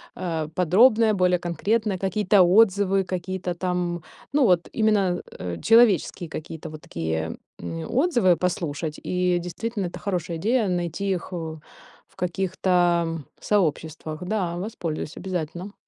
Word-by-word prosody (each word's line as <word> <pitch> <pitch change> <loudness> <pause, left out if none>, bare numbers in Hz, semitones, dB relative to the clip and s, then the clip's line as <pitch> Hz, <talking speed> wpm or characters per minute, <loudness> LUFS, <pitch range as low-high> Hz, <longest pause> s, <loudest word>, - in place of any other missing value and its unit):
э, 165 -4 -2
подробное, 220 +5 +5
более 180 -2 +2
конкретное, 200 +4 0
какие-то 195 0 +3
отзывы, 195 0 +4
какие-то 185 0 -3
там, 175 -2 -2 0.3
ну, 280 -3 +3
вот 180 -3 +3
именно, 205 -5 +2 0.2
э, 85 -2 -4
человеческие 200 -7 +4
какие-то 160 0 -7
вот 155 -1 -10
такие, 80 0 -3 0.2
м, 85 -1 -5
отзывы 240 - +3
послушать. 160 -3 -2
И, 180 -1 +1
действительно, 200 +4 -4
это - - -8
хорошая 175 -4 -2
идея- 220 +4 +1
найти 175 +2 -2
их 185 0 -3
у 160 -2 -5 0.5
в - - -29
каких-то 175 -3 +1 0.2
сообществах. 160 -4 -1
Да, 180 -3 -1
воспользуюсь 175 -6 -4
обязательно. 180 +1 -4
180 Hz, 125 wpm, -24 LUFS, 165-200 Hz, 0.5 s, подробное